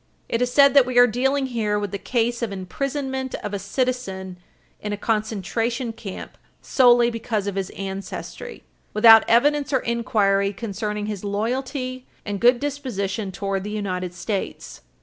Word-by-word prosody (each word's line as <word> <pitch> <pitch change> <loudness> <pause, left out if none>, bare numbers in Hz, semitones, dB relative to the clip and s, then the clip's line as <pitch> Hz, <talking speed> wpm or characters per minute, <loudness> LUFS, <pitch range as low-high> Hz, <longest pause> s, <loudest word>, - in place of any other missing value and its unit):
It 230 - -1
is 250 0 +1
said 280 +1 +6
that 275 -3 +6
we 255 -1 -2
are 245 - +9
dealing 265 +4 +1
here 220 -5 -1
with 205 -2 -3
the 200 - -4
case 240 +1 -1
of 230 -3 -2
imprisonment 265 +7 -3
of 210 - -4
a 200 - -2
citizen 195 -4 -3 0.4
in 210 0 -4
a - - -3
concentration 225 +3 -1
camp 200 -4 -9 0.2
solely 240 -2 +4
because 225 -3 -2
of 200 - -2
his 195 -1 -3
ancestry, 195 - -6 0.3
without 225 +1 +8
evidence 285 +5 +3
or 265 - +2
inquiry 205 -4 +1
concerning 210 0 -4
his 210 -2 -5
loyalty 255 +5 -3 0.2
and 205 -1 -3
good 245 0 +5
disposition 225 -9 -3
towards 195 0 -3
the 210 - -5
United 185 -4 -3
States. 195 +1 -4
225 Hz, 155 wpm, -23 LUFS, 200-255 Hz, 0.4 s, are